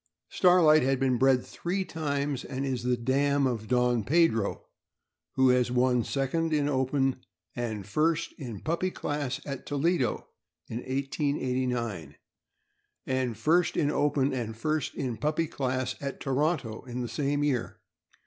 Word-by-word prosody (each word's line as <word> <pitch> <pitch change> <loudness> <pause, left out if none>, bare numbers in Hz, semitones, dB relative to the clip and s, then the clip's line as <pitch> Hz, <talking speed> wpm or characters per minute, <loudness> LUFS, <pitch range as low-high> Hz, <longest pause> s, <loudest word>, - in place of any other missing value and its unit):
Starlight 175 -4 +5
has 135 +1 +2
been 130 -2 +1
bred 130 -1 +4
three 190 +2 -3
times, 145 -4 -2
and 135 +1 -4
is 130 -3 -2
the 125 0 +1
dam 140 +3 +2
of 115 -4 -2
Don 125 -2 +2
Pedro, 130 -6 +2 0.7
who 130 -1 +5
has 125 -1 +3
won 125 -1 +2
second 150 +6 -1
in 145 -1 +2
open 135 -1 0 0.3
and 110 -5 -3
first 155 - 0
in 120 -8 -6
puppy 170 +4 -1
class 145 -6 -3
at 140 -3 -6
Toledo, 145 -1 0 0.4
in 115 - -5
1889, 125 - -2 0.9
and 130 -4 -1
first 165 +9 +2
in 145 -2 +2
open 145 -2 +1
and 115 -3 -4
first 155 +3 -1
in 125 -4 -3
puppy 155 +2 0
class 130 -3 -2
at 140 -1 -4
Toronto, 135 -4 -1
in 125 0 -5
the - - -3
same 145 +2 -1
year. 135 -5 -1
135 Hz, 140 wpm, -28 LUFS, 125-145 Hz, 0.9 s, Starlight